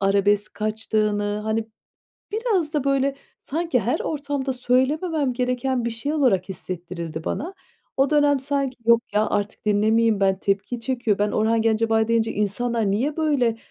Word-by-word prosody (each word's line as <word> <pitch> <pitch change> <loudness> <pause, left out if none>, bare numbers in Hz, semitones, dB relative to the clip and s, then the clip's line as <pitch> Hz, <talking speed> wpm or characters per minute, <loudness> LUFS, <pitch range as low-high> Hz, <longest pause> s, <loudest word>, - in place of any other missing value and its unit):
arabesk 200 +1 +2
kaçtığını, 210 -1 -1
hani, 220 0 -1 0.6
biraz 415 -9 0
da 290 -3 0
böyle 275 0 +1 0.3
sanki 320 -4 -1
her 245 +10 -1
ortamda 285 -3 -2
söylememem 265 +4 +1
gereken 250 0 -1
bir 235 - -1
şey 255 +6 -3
olarak 225 - +2
hissettirildi 170 -3 -6
bana. 350 +6 -3 0.4
O 270 +1 +2
dönem 290 -2 +4
sanki, 275 -2 -1
yok 235 0 +6
ya, 210 +1 +3
artık 205 0 -2
dinlemeyeyim 215 +1 +3
ben, 190 -1 +2
tepki 200 +5 -1
çekiyor. 240 -5 0
Ben 205 0 +1
Orhan 220 +1 +2
Gencebay 225 0 +2
deyince, 230 -1 +1
insanlar 215 +1 0
niye 270 +10 0
böyle 275 -8 +1
230 Hz, 145 wpm, -23 LUFS, 210-275 Hz, 0.6 s, yok